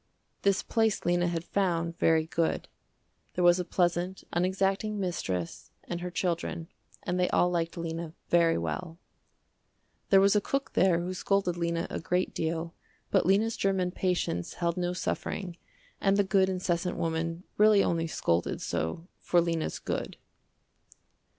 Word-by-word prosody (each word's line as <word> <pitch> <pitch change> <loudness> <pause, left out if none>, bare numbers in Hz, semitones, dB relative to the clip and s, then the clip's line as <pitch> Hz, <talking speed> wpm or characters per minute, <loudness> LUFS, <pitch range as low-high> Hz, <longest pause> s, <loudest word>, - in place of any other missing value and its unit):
This 200 -1 +2
place 225 -2 +1
Lena 175 0 +2
had 170 -1 -2
found 170 -3 -1
very 160 -1 +3
good. 165 0 -1 0.7
There 180 - +1
was 175 +1 +6
a - - 0
pleasant, 175 +1 0
unexacting 195 +4 +1
mistress 95 - -3
and 175 0 -5
her 180 - -3
children, 170 -2 -2 0.3
and 180 0 -1
they 180 - +2
all 180 - +3
liked 170 -1 -1
Lena 165 -1 -4
very 170 -1 +4
well. 85 - -4 1.1
There 195 - +7
was 200 +1 +5
a 210 - +4
cook 275 +5 -2
there 180 -2 +3
who 180 +2 -3
scolded 185 -1 0
Lena 170 0 -1
a - - -2
great 180 +2 -1
deal 165 +1 -2 0.4
but - - +3
Lena's 215 +4 +3
german 190 -2 0
patience 180 - -1
held 170 -1 0
no 180 0 -1
suffering 180 0 -3 0.5
and 195 0 +3
the 205 - +4
good 190 -1 +3
incessant 180 -1 -1
woman 165 +1 -2
really 210 -1 +6
only 165 -1 0
scolded 85 - 0
so 80 - -3
for 175 - +2
Lena's 165 -2 -1
good. - - -4
175 Hz, 150 wpm, -29 LUFS, 165-190 Hz, 1.1 s, There